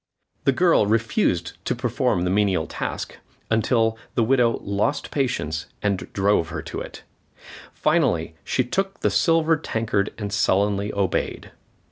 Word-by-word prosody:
The 135 Hz, -, +5 dB
girl 165 Hz, -, +3 dB
refused 110 Hz, -6 st, 0 dB
to -, -, 0 dB
perform 125 Hz, -5 st, 0 dB
the 90 Hz, -, 0 dB
menial 95 Hz, -5 st, +2 dB
task, -, -, -5 dB, 0.3 s
until 110 Hz, 0 st, +2 dB, 0.2 s
the 120 Hz, -, +3 dB
widow 120 Hz, -1 st, +3 dB
lost 100 Hz, +9 st, -1 dB
patience 80 Hz, -, -1 dB, 0.2 s
and 100 Hz, -2 st, -1 dB
drove 100 Hz, -4 st, +2 dB
her -, -, -5 dB
to -, -, -5 dB
it. -, -, -9 dB, 0.7 s
Finally, 80 Hz, -1 st, +1 dB
she 130 Hz, -, +1 dB
took 195 Hz, +10 st, -2 dB
the -, -, +2 dB
silver 165 Hz, -1 st, +3 dB
tankard 110 Hz, -7 st, -1 dB
and 105 Hz, -2 st, -4 dB
sullenly 100 Hz, 0 st, +1 dB
obeyed. 100 Hz, -3 st, -2 dB
110 Hz, 135 wpm, -23 LUFS, 100-125 Hz, 0.7 s, The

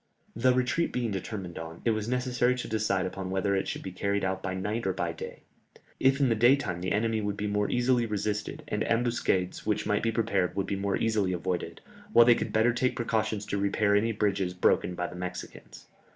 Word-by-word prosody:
The 125 Hz, +3 st, +3 dB
retreat 125 Hz, +6 st, +1 dB
being 120 Hz, -3 st, -1 dB
determined 95 Hz, -2 st, -5 dB
upon, 80 Hz, 0 st, -8 dB
it 115 Hz, -, +4 dB
was 110 Hz, 0 st, -2 dB
necessary 125 Hz, 0 st, +1 dB
to 125 Hz, -, -5 dB
decide 105 Hz, -3 st, 0 dB
upon 95 Hz, 0 st, -5 dB
whether 95 Hz, +1 st, 0 dB
it 95 Hz, -, -1 dB
should -, -, -4 dB
be 95 Hz, -, -5 dB
carried 100 Hz, +2 st, -1 dB
out 95 Hz, 0 st, -2 dB
by 95 Hz, -1 st, -3 dB
night 105 Hz, +3 st, -2 dB
or 95 Hz, -, +1 dB
by -, -, -2 dB
day. -, -, -8 dB, 0.6 s
If 135 Hz, +1 st, +3 dB
in 140 Hz, -, +4 dB
the -, -, +4 dB
daytime 120 Hz, -6 st, +3 dB
the 95 Hz, -, -2 dB
enemy 110 Hz, +1 st, +1 dB
would 105 Hz, -1 st, -2 dB
be 105 Hz, -, -2 dB
more 105 Hz, 0 st, 0 dB
easily 120 Hz, -1 st, +2 dB
resisted, 105 Hz, 0 st, -3 dB
any 105 Hz, +1 st, -1 dB
ambuscades 115 Hz, -6 st, 0 dB
which 105 Hz, -1 st, -1 dB
might 105 Hz, -, +1 dB
be 115 Hz, -, +1 dB
prepared 105 Hz, -5 st, 0 dB
would 100 Hz, -, 0 dB
be 100 Hz, -, -2 dB
more 100 Hz, 0 st, -1 dB
easily 105 Hz, -5 st, +1 dB
avoided, 90 Hz, 0 st, -3 dB, 0.3 s
while 120 Hz, -, +8 dB
they 120 Hz, -, +7 dB
could -, -, -3 dB
better 110 Hz, +2 st, +3 dB
take 125 Hz, +2 st, 0 dB
precautions 110 Hz, -3 st, -1 dB
to 100 Hz, -1 st, -2 dB
repair 100 Hz, +1 st, +2 dB
any 110 Hz, +3 st, +2 dB
bridges 100 Hz, -4 st, 0 dB
broken 90 Hz, 0 st, +2 dB
by 90 Hz, -, -2 dB
the 90 Hz, -, -7 dB
Mexicans. 90 Hz, 0 st, -7 dB
105 Hz, 215 wpm, -28 LUFS, 95-115 Hz, 0.6 s, while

